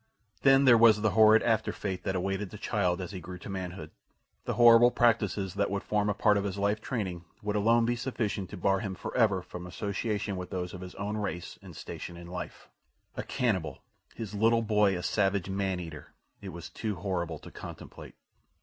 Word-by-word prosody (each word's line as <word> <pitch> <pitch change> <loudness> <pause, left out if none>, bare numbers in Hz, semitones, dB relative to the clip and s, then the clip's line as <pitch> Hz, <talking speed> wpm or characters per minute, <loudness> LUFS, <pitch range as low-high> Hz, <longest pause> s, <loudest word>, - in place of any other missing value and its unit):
Then 135 0 +5
there 120 -3 +7
was 110 -2 +7
the 110 -1 +2
horrid 110 0 +6
after 110 -2 +1
fate 95 -3 -4
that 95 - -1
awaited 95 +2 -2
the 105 - -9
child 95 -4 0
as 90 - -6
he 95 - -6
grew 90 +1 -8
to 90 - -10
manhood. 90 -4 -6 0.5
The - - -2
horrible 120 0 +8
practices 105 -6 +1
that 100 - 0
would 100 0 -2
form 105 -1 0
a 105 - 0
part 105 -1 +3
of 100 - 0
his 100 -1 -3
life 100 +1 0
training 95 -10 -3 0.2
would 105 0 -2
alone 115 +3 +3
be 120 +1 +1
sufficient 110 -6 -3
to - - -8
bar 95 +2 +2
him 100 -3 -4
forever 100 -2 +1
from 90 0 -8
association 100 +2 -3
with 90 0 -6
those 90 -1 -4
of 90 - -8
his 90 0 -9
own 105 +1 -3
race 95 -4 -4
and - - -12
station 85 - -7
in 85 - -10
life. 90 0 -7 0.5
A - - -3
cannibal! 95 - -2 0.3
His 110 -3 -6
little 115 +2 +3
boy 105 -3 +3
a 90 - -6
savage 95 -1 0
man 95 -1 -1
eater! 80 -4 -9 0.3
It 100 - -7
was 85 -1 -8
too 110 -2 -4
horrible 85 -3 -3
to - - -13
contemplate. - - -10
100 Hz, 205 wpm, -29 LUFS, 90-110 Hz, 0.5 s, horrible